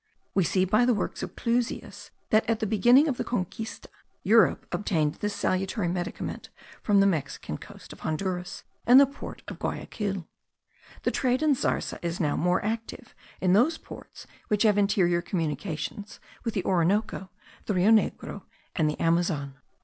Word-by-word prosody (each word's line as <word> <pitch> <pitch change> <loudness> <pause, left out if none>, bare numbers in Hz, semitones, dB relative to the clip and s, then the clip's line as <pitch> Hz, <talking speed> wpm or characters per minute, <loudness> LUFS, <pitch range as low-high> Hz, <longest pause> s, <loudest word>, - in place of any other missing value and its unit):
We 190 - +3
see 185 +3 +2
by 215 +6 +3
the 245 -2 +3
works 205 - -3
of - - -6
Clusius, 240 0 -2 0.2
that 220 +1 +3
at 225 -1 +1
the - - -1
beginning 240 +8 +5
of 265 -5 -1
the - - -1
Conquista, 220 0 -4 0.4
Europe 225 +2 +4
obtained 170 -5 0
this 210 -1 -1
salutary 190 0 -1
medicament 175 0 -4 0.3
from 205 -2 +3
the - - +5
Mexican 155 -8 -2
coast - - -12
of - - -15
Honduras 180 +3 -3 0.2
and 250 +3 +9
the 280 - +8
port 275 +1 -9
of - - -7
Guayaquil. 195 -5 -3 0.8
The - - +1
trade 255 +3 +1
in 305 -2 +4
zarza 260 - -1
is 170 0 -3
now 150 -4 +1
more 180 +4 +1
active 225 +2 -4 0.3
in 185 -1 +3
those 290 - +4
ports - - -12 0.2
which 210 0 +2
have 210 -2 +4
interior 180 -4 +2
communications 170 +3 -4 0.2
with 230 - -3
the 190 - -1
Orinoco, 190 +2 +1 0.4
the 205 - 0
Rio 185 +4 +4
Negro, 220 -1 +1 0.3
and 155 -3 +2
the 150 - -4
Amazon. 165 -5 0
200 Hz, 165 wpm, -27 LUFS, 175-225 Hz, 0.8 s, and